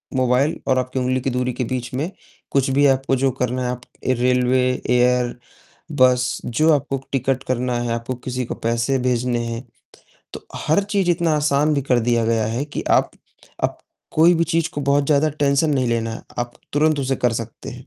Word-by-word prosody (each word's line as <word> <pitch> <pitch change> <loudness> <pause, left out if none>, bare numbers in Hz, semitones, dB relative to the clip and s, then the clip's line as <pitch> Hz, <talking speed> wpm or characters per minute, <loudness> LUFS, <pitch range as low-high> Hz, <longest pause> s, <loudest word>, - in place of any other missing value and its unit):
Mobile 130 +4 +2
और 130 -1 +3
आपकी 130 +1 -3
उंगली 130 0 0
की 135 - -1
दूरी 125 0 -1
के 130 - -2
बीच 125 0 -4
में, 150 +8 -2 0.4
कुछ 135 -1 +2
भी 140 +2 +3
आपको 135 0 +2
जो 135 0 +1
करना 125 0 -1
है, 125 - -2 0.4
रेलवे, 125 +1 +2 0.2
एयर, 125 0 +2 0.6
बस 125 -2 +3
जो 155 +7 +2
आपको 140 -1 0
टिकट 135 0 0
करना 125 -1 -1
है, 120 -1 -2
आपको 115 +2 -3
किसी 125 -1 -2
को - - -5
पैसे 115 +4 0
भेजने 125 -1 0
हैं, 115 +2 -5 0.7
तो - - -9
हर 160 +6 +1
चीज़ 195 -3 0
इतना 170 -1 +1
आसान 150 0 +2
भी 140 - 0
कर 125 -2 +2
दिया 120 0 +1
गया 115 -1 +1
है 115 +5 -2
कि 145 - -5
आप - - +3 0.5
अब - - 0 0.4
कोई 170 +3 +6
भी 165 - +2
चीज़ 165 0 0
को 145 - -2
बहुत 140 0 +2
ज़्यादा 150 +1 +3
टेंशन 145 +1 +1
नहीं 130 -3 +1
लेना 115 -1 -1
है, - - -9 0.2
आप 120 0 -2 0.2
तुरंत 150 0 +2
उसे 135 0 -1
कर 125 -1 +1
सकते 115 0 -6
हैं। 125 +1 -11
130 Hz, 195 wpm, -21 LUFS, 125-140 Hz, 0.7 s, कोई